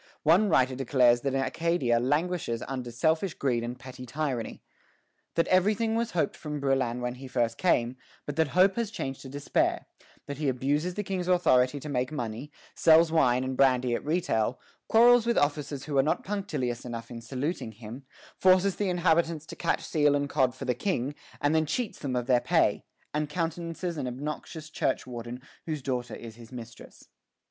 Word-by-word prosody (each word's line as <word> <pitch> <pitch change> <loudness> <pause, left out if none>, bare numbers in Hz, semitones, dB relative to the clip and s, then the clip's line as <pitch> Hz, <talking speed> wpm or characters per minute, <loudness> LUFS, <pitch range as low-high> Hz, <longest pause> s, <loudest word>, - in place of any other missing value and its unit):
One 180 +7 +5
writer 130 -5 +3
declares 125 -2 +3
that 135 0 -1
Acadia 135 -3 +1
languishes 145 -2 -1
under 130 -2 -4
selfish 160 +8 0
greed 120 -4 0
and 120 +1 -5
petty 130 0 -10
tyranny; 130 -3 -3 0.7
that 165 - +3
everything 210 +4 +3
was 230 0 0
hoped - - +1
from 150 -1 -5
Brouillan 130 -3 0
when 125 0 -2
he 130 +1 -10
first 120 -3 -1
came, 130 -8 +2 0.3
but 145 - -5
that 160 -1 +3
hope 190 +3 +5
has 230 -3 0
changed 135 -11 -5
to 135 - -9
despair; 145 +1 0 0.4
that 140 0 -6
he 150 -3 +1
abuses 145 +7 0
the 210 - -2
King's 185 -2 -3
authority 145 -7 +3
to 150 - -8
make 130 -1 -1
money, 125 0 -5 0.2
sells 165 0 +5
wine 130 -6 +3
and 130 0 -3
brandy 130 -2 +3
at - - -2
retail, 145 -8 0 0.3
quarrels 235 +1 +6
with 235 - +2
officers 145 -1 0
who 145 -3 0
are - - +8
not 150 - 0
punctilious 155 - -3
enough 115 -1 -7
in 115 -1 -7
saluting 130 0 -3
him, 115 +5 -9 0.3
forces 185 +1 +4
the 205 -2 0
inhabitants 170 -3 +1
to - - -9
catch - - -1
seal 145 -2 +2
and 145 0 -1
cod 130 -4 +1
for - - -7
the 125 - +1
King, 135 - -1 0.3
and 145 +1 +1
then 160 -1 +2
cheats 240 +6 -2
them 135 -3 -3
of 125 -1 -1
their 125 -1 +3
pay, - - +2 0.3
and 150 0 -1
countenances 165 +1 -3
an 130 - -2
obnoxious 150 +4 -6
churchwarden 120 -3 -3 0.3
whose 155 -4 -3
daughter 125 -2 -3
is 115 -1 -10
his 115 0 -13
mistress. 120 -2 -11
140 Hz, 180 wpm, -28 LUFS, 125-165 Hz, 0.7 s, are